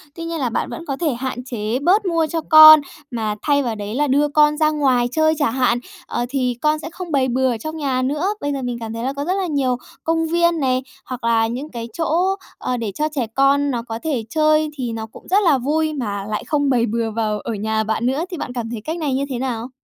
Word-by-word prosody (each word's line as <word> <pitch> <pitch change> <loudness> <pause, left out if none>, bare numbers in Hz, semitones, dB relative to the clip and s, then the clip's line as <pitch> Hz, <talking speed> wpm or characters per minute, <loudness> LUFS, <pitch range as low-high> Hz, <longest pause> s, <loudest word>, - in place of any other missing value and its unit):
Tuy 335 - -6
nhiên 330 -1 -3
là 255 -4 0
bạn - - -2
vẫn 335 - -7
có 275 -3 -3
thể 315 -5 0
hạn 250 0 -4
chế 235 -1 -3
bớt 375 +8 +3
mua 330 -3 +1
cho 325 +1 -2
con, 310 0 +11 0.3
mà 215 -3 -2
thay 285 -1 +2
vào 235 -3 -2
đấy 210 +2 -5
là 295 +1 +1
đưa 285 +3 +3
con 300 0 +3
ra 310 -1 +3
ngoài 265 -5 +2
chơi 315 +1 +3
chả 290 -6 +2
hạn, 245 -1 +1 0.3
ờ, 240 - -2
thì 255 -3 -1
con 305 0 +2
sẽ - - -6
không 345 0 -8
bày 270 -2 +2
bừa 260 +1 +1
ở 235 - -1
trong 310 +7 -6
nhà 270 -4 -1
nữa. 295 +7 -1
Bây 285 - -1
giờ 275 - -3
mình 245 -1 -3
cảm 225 -1 -6
thấy 230 +1 -5
là 265 +2 -1
có 280 +1 -4
rất 365 - 0
là 385 -1 -1
nhiều 270 -5 0 0.3
công 325 0 0
viên 340 0 +2
này, 255 -1 +1 0.2
hoặc 250 -2 -7
là 225 -1 +3
những 260 +6 -5
cái 230 -1 -6
chỗ, 345 +4 +1 0.2
ờ, 250 - -2
để 225 -4 -3
cho 305 +1 0
trẻ 250 -5 -1
con 280 +1 +3
nó 240 - -2
có 225 -1 -6
thể 280 -8 -1
chơi, 310 +1 +2
thì 245 -3 -3
nó 220 -1 -4
cũng 220 - -15
rất 400 +3 +3
là 315 -7 +4
vui 310 +4 0
mà 205 -8 -3
lại 210 - -2
không 285 -2 +1
bày 240 -3 +3
bừa 225 0 -2
vào 215 -1 -1
ở 230 - -4
nhà 220 +1 -1
bạn 220 +2 -1
nữa. 270 +7 0
Thì 350 - -4
bạn 250 - -5
cảm 235 -2 -4
thấy 230 -3 -5
cách 320 +2 -3
này 300 -5 -1
như 275 +2 0
thế 255 -3 -3
nào? 245 -2 -3
270 Hz, 265 wpm, -20 LUFS, 235-310 Hz, 0.3 s, con